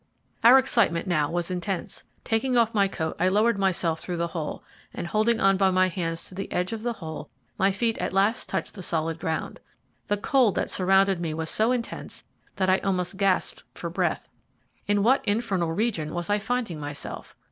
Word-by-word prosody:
Our 240 Hz, +3 st, +9 dB
excitement 235 Hz, -10 st, +2 dB
now 155 Hz, -5 st, +1 dB
was 175 Hz, +1 st, -1 dB
intense. 180 Hz, +1 st, -3 dB, 0.2 s
Taking 245 Hz, +3 st, +1 dB
off 230 Hz, -1 st, +3 dB
my 200 Hz, -2 st, +3 dB
coat 160 Hz, -4 st, -3 dB
I 180 Hz, -, +3 dB
lowered 210 Hz, +3 st, +3 dB
myself 175 Hz, -4 st, +1 dB
through 175 Hz, -1 st, -4 dB
the 170 Hz, 0 st, -1 dB
hole, 160 Hz, -4 st, -4 dB, 0.3 s
and -, -, -4 dB
holding 220 Hz, +5 st, +1 dB
on 195 Hz, 0 st, +4 dB
by 190 Hz, 0 st, +4 dB
my 185 Hz, 0 st, +3 dB
hands 165 Hz, -2 st, -3 dB
to -, -, -10 dB
the 195 Hz, +1 st, -6 dB
edge 180 Hz, +4 st, -1 dB
of 220 Hz, -, -5 dB
the 240 Hz, +1 st, -1 dB
hole, 160 Hz, -7 st, -7 dB, 0.3 s
my 195 Hz, +1 st, +4 dB
feet 225 Hz, +3 st, -1 dB
at -, -, -2 dB
last 200 Hz, +4 st, +1 dB
touched -, -, -3 dB
the 195 Hz, -, -8 dB
solid 165 Hz, -1 st, -2 dB
ground. 160 Hz, -3 st, -3 dB, 0.5 s
The 205 Hz, -, +1 dB
cold 240 Hz, 0 st, +2 dB
that -, -, -1 dB
surrounded 190 Hz, 0 st, +3 dB
me 160 Hz, -2 st, -2 dB
was 160 Hz, 0 st, -2 dB
so 220 Hz, +3 st, +2 dB
intense 245 Hz, -2 st, -4 dB, 0.3 s
that 190 Hz, -1 st, 0 dB
I 185 Hz, 0 st, +4 dB
almost 185 Hz, -1 st, -1 dB
gasped 195 Hz, -2 st, +1 dB
for -, -, -5 dB
breath. -, -, -1 dB, 0.6 s
In 205 Hz, -1 st, +2 dB
what 260 Hz, +5 st, +4 dB
infernal 205 Hz, -6 st, 0 dB
region 170 Hz, -5 st, -1 dB
was 175 Hz, +3 st, -2 dB
I 205 Hz, -, +3 dB
finding 225 Hz, -7 st, -2 dB
myself? 145 Hz, -1 st, -7 dB
190 Hz, 195 wpm, -26 LUFS, 170-220 Hz, 0.6 s, Our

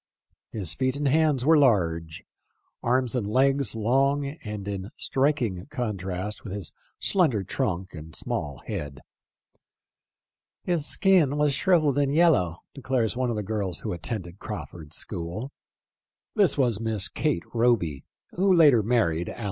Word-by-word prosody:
His 95 Hz, -8 st, -1 dB
feet 130 Hz, 0 st, 0 dB
and 145 Hz, 0 st, -1 dB
hands 145 Hz, -3 st, +2 dB
were 160 Hz, +2 st, +6 dB
large/ 85 Hz, -, +1 dB, 0.6 s
arms 125 Hz, +1 st, +1 dB
and 115 Hz, -5 st, -1 dB
legs 135 Hz, +1 st, +2 dB
long 135 Hz, +6 st, +2 dB, 0.2 s
and 105 Hz, -2 st, -6 dB
in 100 Hz, -1 st, -4 dB
striking 130 Hz, -9 st, 0 dB
contrast 105 Hz, -7 st, -4 dB
with 100 Hz, -, -6 dB
his 100 Hz, -5 st, -6 dB, 0.3 s
slender 150 Hz, -, +2 dB
trunk 95 Hz, -3 st, -2 dB
and 80 Hz, -1 st, -9 dB
small 70 Hz, -3 st, -4 dB
head. 70 Hz, -2 st, -5 dB, 0.8 s
" -, -, -67 dB
His 170 Hz, -4 st, -1 dB
skin 175 Hz, -8 st, +3 dB
was 150 Hz, -1 st, +2 dB
shrivelled 155 Hz, -3 st, +3 dB
and 140 Hz, 0 st, +1 dB
yellow," 120 Hz, -, +3 dB, 0.2 s
declares 130 Hz, -5 st, -1 dB
one 125 Hz, 0 st, 0 dB
of 115 Hz, -, -1 dB
the 105 Hz, -, -2 dB
girls* 100 Hz, -4 st, -3 dB
who -, -, -3 dB
attended 90 Hz, 0 st, -5 dB
Crawford's 80 Hz, -2 st, -7 dB
school. 100 Hz, +8 st, -5 dB
115 Hz, 115 wpm, -26 LUFS, 95-140 Hz, 0.8 s, were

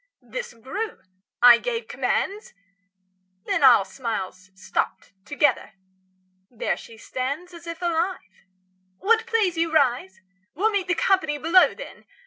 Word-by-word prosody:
This -, -, -7 dB
grew; 390 Hz, -, -5 dB, 0.4 s
I 240 Hz, -1 st, +9 dB
gave 475 Hz, -1 st, -3 dB
commands; 410 Hz, +3 st, -2 dB, 0.9 s
Then -, -, 0 dB
all 245 Hz, -7 st, +7 dB
smiles 190 Hz, -4 st, -5 dB
stopped 195 Hz, -, -3 dB
together.° 290 Hz, -5 st, +1 dB, 0.8 s
There 235 Hz, -, -2 dB
she 225 Hz, -, -13 dB
stands 280 Hz, +10 st, -4 dB
°46 -, -, -10 dB
As 340 Hz, 0 st, -13 dB
if 335 Hz, 0 st, -7 dB
alive. 340 Hz, -, -3 dB, 0.5 s
Will't 450 Hz, -, +2 dB
please 430 Hz, -7 st, +1 dB
you 330 Hz, -1 st, 0 dB
rise? 250 Hz, -10 st, +1 dB, 0.4 s
We'll 425 Hz, +7 st, +1 dB
meet 395 Hz, -3 st, -1 dB
The 350 Hz, -, +1 dB
company 325 Hz, -4 st, +1 dB
below, 335 Hz, +5 st, +4 dB
then. -, -, -11 dB
325 Hz, 130 wpm, -24 LUFS, 245-385 Hz, 0.9 s, I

